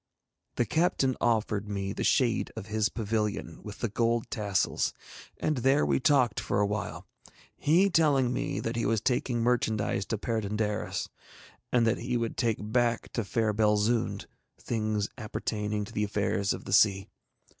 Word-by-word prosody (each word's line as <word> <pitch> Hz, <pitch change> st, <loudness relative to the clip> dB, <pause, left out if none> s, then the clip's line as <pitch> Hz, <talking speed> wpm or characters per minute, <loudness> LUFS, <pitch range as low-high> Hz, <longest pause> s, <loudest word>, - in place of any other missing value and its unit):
The 120 Hz, -, +1 dB
captain 135 Hz, -, +1 dB
offered 105 Hz, -3 st, +1 dB
me 100 Hz, -1 st, -3 dB
the -, -, -3 dB
shade 120 Hz, -4 st, +2 dB
of 110 Hz, -3 st, -6 dB
his 110 Hz, 0 st, 0 dB
pavilion 105 Hz, -6 st, -2 dB
with 105 Hz, -1 st, -9 dB
the 115 Hz, -, +1 dB
gold 115 Hz, +2 st, 0 dB
tassels, 100 Hz, -3 st, 0 dB, 0.4 s
and 155 Hz, -2 st, 0 dB
there 135 Hz, +4 st, +3 dB
we -, -, +2 dB
talked 125 Hz, -4 st, +3 dB
for -, -, -1 dB
awhile, 105 Hz, +1 st, -2 dB, 0.5 s
he 175 Hz, +7 st, +3 dB
telling 145 Hz, -8 st, +3 dB
me -, -, -2 dB
that 115 Hz, +1 st, -3 dB
he 115 Hz, -, 0 dB
was 115 Hz, -1 st, +2 dB
taking 120 Hz, 0 st, 0 dB
merchandise 110 Hz, -5 st, 0 dB
to 110 Hz, -, -1 dB
Perd├│ndaris, 105 Hz, -1 st, -2 dB, 0.6 s
and 120 Hz, -2 st, +3 dB
that 115 Hz, -, +1 dB
he 125 Hz, +1 st, -1 dB
would 115 Hz, -1 st, -2 dB
take 115 Hz, -4 st, +1 dB
back 115 Hz, +2 st, 0 dB
to 115 Hz, -, -1 dB
fair 110 Hz, +2 st, 0 dB
Belzoond 105 Hz, +2 st, +1 dB, 0.3 s
things 110 Hz, -3 st, -1 dB
appertaining 105 Hz, -1 st, -3 dB
to 115 Hz, -, -12 dB
the 105 Hz, -, 0 dB
affairs 100 Hz, -1 st, 0 dB
of -, -, -4 dB
the 95 Hz, -, -4 dB
sea. 100 Hz, -1 st, +4 dB
110 Hz, 155 wpm, -29 LUFS, 105-120 Hz, 0.6 s, sea